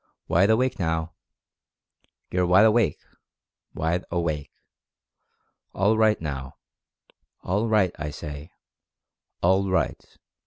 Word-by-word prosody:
WIDE 95 +5 +3
AWAKE 125 +2 +2
NOW— 80 -1 -1 1.2
you're 90 -1 +1
Wide 95 +4 +6
Awake 110 -7 +3 0.4
— - - -58
wide 80 +3 -1
awake! 80 -4 -2 1.3
All 100 +3 +3
right, 110 -1 +3
now 70 -4 -6 0.4
— - - -39
ALL 105 +5 0
RIGHT, 105 -5 +2
I 75 0 -3
say— 75 +1 -8 0.9
ALL 95 +2 +3
RIGHT! 95 - -2
90 Hz, 110 wpm, -25 LUFS, 80-105 Hz, 1.3 s, Wide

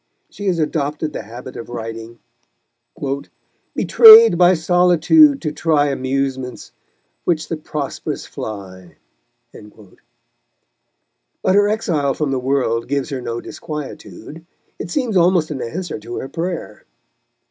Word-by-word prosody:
She 205 -8 -6
has 180 -3 +1
adopted 150 -1 -2
the - - -5
habit 120 +4 -10
of 115 - -8
writing, 115 0 -7 1.6
Betrayed 455 0 +8
by 180 +1 +5
solitude 180 - +4
to 155 - -2
try 150 -2 +1
Amusements, 130 -1 -3 0.5
which 160 -3 -1
the 165 - -2
prosperous 150 -2 -5
fly. 95 -4 -9 0.6
But 105 -2 -16 1.6
her 205 +1 +4
exile 155 -11 -1
from 150 -3 -2
the 135 - -1
world 125 -3 -1
gives 140 +1 -2
her 135 -3 -4
no 115 -1 -5
disquietude. 150 - -9 0.4
It - - -6
seems 250 -8 -2
almost 175 -3 +3
an 135 -4 -4
answer 170 +4 -5
to 115 +3 -8
her 135 - -6
prayer. 170 - -5
145 Hz, 120 wpm, -19 LUFS, 120-175 Hz, 1.6 s, Betrayed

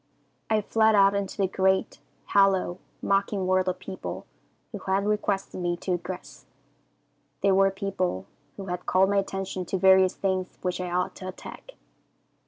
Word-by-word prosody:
"I 215 -1 +2
fled 220 +1 +3
out 195 0 +5
into 200 -1 -3
the 195 - +2
great, 190 0 +1 0.3
hollow, 195 -2 +3 0.2
mocking 195 -1 +1
world 185 0 +2
of 185 - -3
people 190 -1 -7 0.5
who 205 - -6
had 190 +1 0
requested 205 -3 -1
me 175 0 -1
to 180 +1 -1
aggress. 180 +1 -8 1.0
They 200 - +3
were 195 0 +5
people 190 - -2 0.3
who 195 - -6
had 180 -1 -5
called 190 +1 +3
my 200 - +2
attention 195 -1 -2
to 190 - -2
various 190 0 +5
things 185 -1 -2
which 180 0 -1
I 180 - -3
ought 180 +1 -1
to 185 - -7
attack. - - -10
190 Hz, 160 wpm, -26 LUFS, 185-195 Hz, 1.0 s, out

